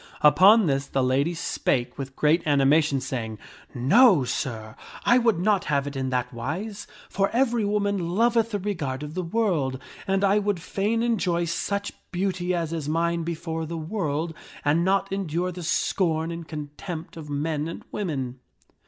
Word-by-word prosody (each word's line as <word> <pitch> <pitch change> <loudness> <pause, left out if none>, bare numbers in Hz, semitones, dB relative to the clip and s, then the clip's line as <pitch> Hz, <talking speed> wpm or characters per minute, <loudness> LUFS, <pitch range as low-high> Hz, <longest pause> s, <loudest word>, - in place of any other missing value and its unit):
Upon 190 +9 +7
this 135 -2 0
the 135 - 0
lady 140 +7 +1
spake 125 -5 -1
with 135 -1 -6
great 155 +3 +3
animation, 145 0 +3
saying, 120 -4 -4 0.3
" - - -28
No, 170 - +5
sir, 115 -3 -4 0.3
I 240 - +6
would 230 -6 +2
not 195 +1 +2
have 140 -2 +1
it 145 0 -6
in 130 -1 -2
that 125 -1 -1
wise, 180 - -5 0.2
for 195 0 0
every 240 -2 +1
woman 200 -3 0
loveth 230 +4 +2
the 210 - -1
regard 155 -9 -3
of 150 +1 -7
the 185 - -2
world, 165 - 0 0.3
and 195 +1 +1
I 200 +1 +4
would 205 -3 -1
fain 210 +6 -1
enjoy 185 -7 +1
such 200 +4 -2 0.2
beauty 180 -1 -1
as 165 -1 -2
is 155 -3 -3
mine 170 +1 +1
before 165 -1 -4
the 165 +1 -4
world, 160 -2 -2 0.3
and 155 +4 +3
not 195 +1 +1
endure 180 -2 -1
the 180 0 -8
scorn 165 -1 0
and 165 -1 -7
contempt 155 +2 -7
of 155 -3 -9
men 150 +1 -1
and 165 - -7
women." 135 -10 -3
165 Hz, 170 wpm, -25 LUFS, 145-195 Hz, 0.3 s, Upon